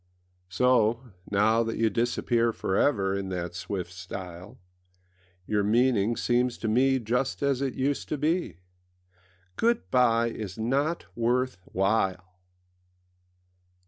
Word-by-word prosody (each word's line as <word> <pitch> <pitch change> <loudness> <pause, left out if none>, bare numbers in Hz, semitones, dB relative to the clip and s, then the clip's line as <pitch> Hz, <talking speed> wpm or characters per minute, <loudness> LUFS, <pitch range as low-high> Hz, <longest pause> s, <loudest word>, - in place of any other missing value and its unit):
So, 120 +3 +2 0.2
now 110 +3 +3
that 115 -1 -2
you 115 -1 +2
disappear 120 -1 +1
For 95 - -3
ever 100 -6 +2
in 100 -1 -3
that 90 -2 -4
swift 90 0 -5
style, 90 0 -8 0.9
Your 105 +1 +1
meaning 115 0 +2
seems 125 0 +1
to 110 - -4
me 130 +4 +3
Just 125 +4 -1
as 140 -2 +1
it 135 -2 -2
used 140 +2 -1
to 150 - -1
be: 160 - -1 1.0
âGood 235 0 +2
bye 115 -2 +3
is 105 -3 -7
not 140 +9 0
worth 125 +1 0
while! 95 -2 -1
115 Hz, 120 wpm, -27 LUFS, 100-130 Hz, 1.0 s, now